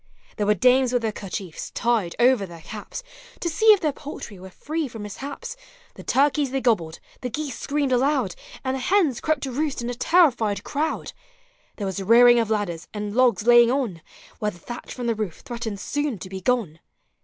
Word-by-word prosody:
There 205 - 0
were 210 - +4
dames 255 +5 +4
with 245 -2 +1
their 220 - 0
kerchiefs 195 -4 -6
tied 230 -7 0
over 240 -4 +4
their 170 -2 -11
caps, 220 - -7 0.4
To - - -2
see 340 +7 0
if 425 -3 +8
their 310 -3 +1
poultry 275 -8 -9
were 190 +1 -10
free 310 - -3
from 225 -4 -8
mishaps; 280 - -6 0.4
The - - -11
turkeys 285 +1 +2
they 270 +1 -1
gobbled, 180 -11 +1 0.2
the 250 - -3
geese 285 0 -4
screamed 285 -2 -1
aloud, 270 +4 +2 0.3
And 260 -1 -1
the 265 - -2
hens 310 - +2
crept 310 -3 0
to 270 - -3
roost 290 +2 -1
in 240 0 -3
a - - -3
terrified 240 - +3
crowd; 290 +6 -2 0.6
There 205 - -4
was 195 0 -3
rearing 240 +4 +7
of 225 -2 0
ladders, 200 -6 -2
and 210 0 -3
logs 240 -5 +3
laying 240 -1 +7
on. 240 - -1 0.4
Where 210 - 0
the 175 - -11
thatch 240 +8 -8
from 245 - -5
the 235 - +2
roof 210 -6 -4
threatened 235 -4 -5
soon 290 +2 -2
to 185 +1 -9
be 190 0 -6
gone. 200 -8 0
240 Hz, 200 wpm, -24 LUFS, 205-275 Hz, 0.6 s, if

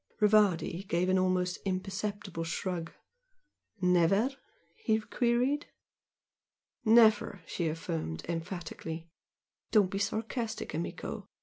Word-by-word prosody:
Rivardi 205 -4 +3
gave 175 +1 +1
an 185 0 +4
almost 185 -1 +1
imperceptible 195 -1 -3
shrug. 165 0 -3 0.9
"Never?" 180 +7 +4 0.4
he 220 +4 +1
queried. 245 +6 +1 1.2
"Never!" 220 -1 +5
she 170 - -2
affirmed, 80 - -3
emphatically 165 -1 -5 0.6
"Don't 205 -4 +4
be 195 - -2
sarcastic, 220 +2 -2
amico! 165 +3 -4
185 Hz, 90 wpm, -31 LUFS, 170-215 Hz, 1.2 s, Never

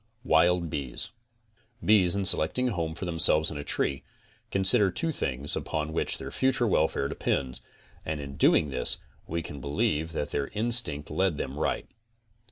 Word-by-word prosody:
WILD 85 -3 +3
BEES 70 - -4 0.7
Bees 100 -4 +5
in 100 -1 -1
selecting 95 +8 +2
a - - -2
home 80 -4 -3
for 90 - -5
themselves 80 -2 +3
in 75 - -6
a - - -4
tree, 70 -1 -1 0.5
consider 95 +2 +3
two 160 - 0
things 70 - -3
upon 80 0 -3
which - - -1
their - - -7
future 130 -2 +1
welfare 80 -7 +1
depends, 65 -2 -2 0.4
and 80 -1 -3
in 70 -1 -7
doing 75 - +3
this - - 0 0.3
we 85 0 -3
can 70 -3 -8
believe 75 +3 -1
that 75 - -3
their 70 -1 -1
instinct 105 -10 +3
led 95 -5 +1
them 65 - -4
right. - - -1
80 Hz, 165 wpm, -28 LUFS, 75-95 Hz, 0.7 s, Bees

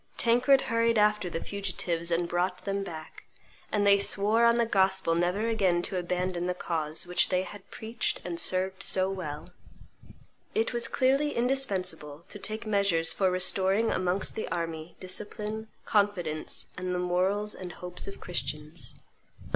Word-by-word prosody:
Tancred 250 +4 +4
hurried 230 0 +1
after 210 -3 +2
the 165 - -4
fugitives 180 -4 -2
and 170 0 +1
brought 180 +1 -2
then 200 0 -1
back; 160 -4 -9 0.5
and 205 -1 +1
they 200 0 +6
swore 210 +4 +3
on 235 0 +4
the 235 - +3
Gospel 190 -5 +2
never 180 +6 0
again 190 -6 +1
to 185 - -1
abandon 180 0 -2
the 180 - -1
cause 160 -3 -1
which 180 0 +1
they 185 0 +1
had 200 0 -11
preached 225 +1 -3
and 170 -1 -3
served 185 +2 +2
so 190 0 +2
well. 170 -3 -6 1.0
It 445 - +1
was 235 0 0
clearly 275 +3 +1
indispensable 185 - +1
to 205 - -4
take 215 +3 -5
measures 200 -6 +2
for 190 -2 +2
restoring 190 +4 +2
amongst 185 +1 0
the 220 - -4
army 165 -1 -4
discipline, 210 +3 -3 0.2
confidence, 180 -7 0
and 180 0 -3
the - - 0
morals 185 +4 +1
and 180 -2 -7
hopes 180 +1 -5
of 195 - -8
Christians. 150 -4 -3
190 Hz, 155 wpm, -28 LUFS, 175-210 Hz, 1.0 s, they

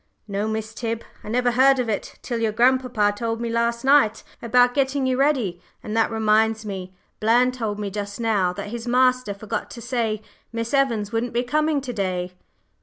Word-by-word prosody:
"No, 200 +1 -2
Miss 220 0 -3
Tib. 230 0 -3 0.2
I - - -8
never 245 +2 +2
heard 265 +2 +5
of 250 -2 -1
it 215 -2 -3
till 235 -2 -3
your 225 -1 +1
grandpapa 240 -2 +2
told 225 +1 -2
me 235 -1 -3
last 235 +1 0
night 270 -6 +4 0.2
about 245 +1 +4
getting 275 0 +1
you 260 0 +1
ready. 255 -10 +1 0.2
And 215 - -4
that 225 - +3
reminds 220 0 +2
me 190 -2 -6 0.2
Bland 240 +4 +3
told 220 -5 -3
me 205 -1 -4
just 205 +1 -5
now 210 -6 +1
that 200 +2 -6
his 235 +2 -6
master 255 -3 +2
forgot 205 +1 -4
to - - -9
say 225 -3 -2 0.3
Miss 230 +1 -4
Evans 235 -7 +1
wouldn't 230 +1 -2
be 240 +1 +1
coming 300 +3 +1
to 255 -2 -5
day." 185 -3 -2
230 Hz, 190 wpm, -23 LUFS, 210-250 Hz, 0.3 s, heard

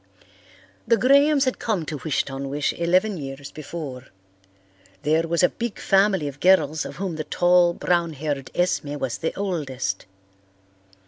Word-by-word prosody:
The 230 - +4
Grahams 280 +3 +4
had 255 - -1
come 205 -8 -1
to 150 - -4
Wish 155 -4 +1
ton 135 0 -5
wish 145 +1 -1
eleven 185 +4 +1
years 135 -1 -7
before. 145 -4 -7 1.0
There 160 +3 +2
was 170 +1 +1
a - - +6
big 235 -2 -5
family 195 -5 +2
of 140 0 -7
girls 160 -4 +3
of - - -7
whom 185 -4 -4
the 155 - -2
tall, 175 +1 +3
brown 170 -2 0
haired 145 -2 -4
Esme 170 -5 0
was 130 -4 -3
the 160 - -1
oldest. 140 - -3
165 Hz, 150 wpm, -23 LUFS, 145-190 Hz, 1.0 s, a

